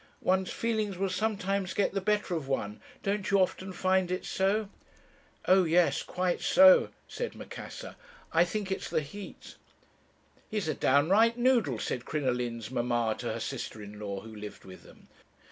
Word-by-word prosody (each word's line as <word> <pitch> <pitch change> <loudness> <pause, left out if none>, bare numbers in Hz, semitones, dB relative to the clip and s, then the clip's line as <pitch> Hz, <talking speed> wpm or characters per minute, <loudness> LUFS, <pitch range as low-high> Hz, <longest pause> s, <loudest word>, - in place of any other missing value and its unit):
One's 185 0 +2
feelings 215 -4 -1
will 195 0 -1
sometimes 195 -2 -1
get 200 - +1
the 195 - -1
better 210 -1 0
of 155 -5 -3
one; 105 -6 -2 0.2
don't 200 0 -1
you 200 -1 +4
often 190 +1 0
find 185 0 +1
it 185 0 -2
so?' 200 +3 +1 0.8
"'O 190 0 +6
yes! 170 +1 +3
quite 180 -1 -1
so,' 280 0 +7 0.2
said - - -5
Macassar. - - -8 0.4
'I 165 +1 +5
think 195 +2 -3
it's 190 - -3
the - - +1
heat.' 190 +8 -10 0.9
"'He's 210 -6 -2
a 155 - +1
downright 190 - +4
noodle,' 240 - +2
said 120 +2 -3
Crinoline's 125 -5 -2
mamma 120 -2 0
to - - -3
her - - -4
sister 110 - -5
in 105 0 -9
law, 100 -2 -4
who 110 -1 -11
lived 105 0 -9
with 95 -1 -11
them. - - -18
185 Hz, 160 wpm, -30 LUFS, 130-205 Hz, 0.9 s, so